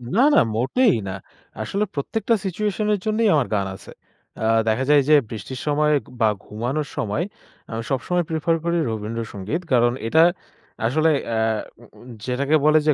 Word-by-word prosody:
না 240 - +4
না - - +7 0.2
মোটেই 195 - +3
না, 95 - -4 0.5
আসলে 200 - -1
প্রত্যেকটা 220 - -1
সিচুয়েশন 210 +3 -1
এর 205 - 0
জন্যেই 215 0 +2
আমার 140 -5 +2
গান 100 -1 0
আছে। - - -13 0.5
আ - - +1 0.2
দেখা 110 +4 +1
যায় 150 -1 +6
যে 155 - +8
বৃষ্টির 115 +4 -6
সময় 150 +1 +2 0.3
বা 110 - +5 0.2
ঘুমানোর 125 +8 -3
সময় 105 +9 -1 0.5
আমি 115 0 -3
সবসময় 175 +7 0
প্রেফার 165 +1 +1
করি 170 0 +1
রবীন্দ্র 110 +1 -4
সঙ্গীত 105 - -3
কারণ 120 0 +4
এটা 160 +8 +5 0.6
আসলে 155 +7 +2 0.2
অ্যা 115 -1 -1 0.4
উম 120 - -15
উম 120 - -15 0.2
যেটাকে 140 +4 +1
বলে 155 +1 +6
যে 150 - +6
140 Hz, 165 wpm, -22 LUFS, 115-170 Hz, 0.6 s, যে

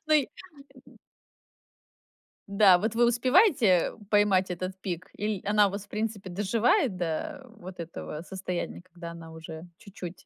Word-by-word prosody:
Ну 310 - +4
и 285 -4 +3 0.6
м - - -18 1.6
Да, 195 -3 +6
вот 220 +2 -2
вы 240 0 +5
успеваете 245 - +4 0.2
поймать 200 -3 +3
этот 185 +1 -4
пик, 180 -2 -5
иль 210 -1 -2
она 205 0 +4
у - - -3
вас, 200 +1 -6
в - - -32
принципе, 210 -3 -4
доживает 220 - +1
до, 175 - -3
э, - - -19
вот 180 0 -10
этого 165 -2 -6
состояния, 185 -2 -5
когда 175 -2 -10
она 165 -1 -10
уже 160 +1 -9
чуть-чуть? 190 -5 -10
195 Hz, 150 wpm, -28 LUFS, 175-220 Hz, 1.6 s, Да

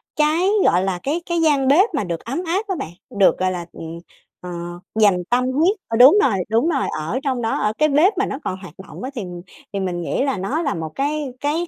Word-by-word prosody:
cái, 315 +5 +2 0.2
gọi 180 +2 +3
là, 190 -2 -1
cái 310 +5 -1
cái 340 -1 -1
gian 290 -4 +3
bếp 355 - +5
mà 280 - 0
được 170 -3 -3
ấm 275 +10 -3
áp 385 +6 -1
á 385 - -1
bạn, 270 - -5 0.2
được 200 -2 +3
gọi 185 0 +1
là, 175 -2 -4
ừm, 165 +1 -8 0.4
ờ, 180 - -7 0.5
dành 185 -4 +4
tâm 250 +1 +2
huyết, 325 +10 +2
ờ, 225 - -1
đúng 265 - +8
rồi, 255 - +3 0.2
đúng 230 +9 +2
rồi, 280 -6 0
ở 165 +12 -2
trong 260 -3 -1
đó, 225 - -1
ở 210 0 0
cái 305 0 +3
bếp 310 +9 +4
mà 400 - +2
nó 270 - -4
còn 185 - -3
hoạt 190 -2 -11
động - - -10
á 260 - -3
thì 235 - -3 0.5
thì 200 - -1
mình 180 -2 -2
nghĩ 175 - -1
là 270 -6 0
nó 265 - -2
là 280 - 0
một 160 -1 -5
cái 295 +2 -1 0.2
cái 315 +4 -1
265 Hz, 245 wpm, -21 LUFS, 190-310 Hz, 0.5 s, đúng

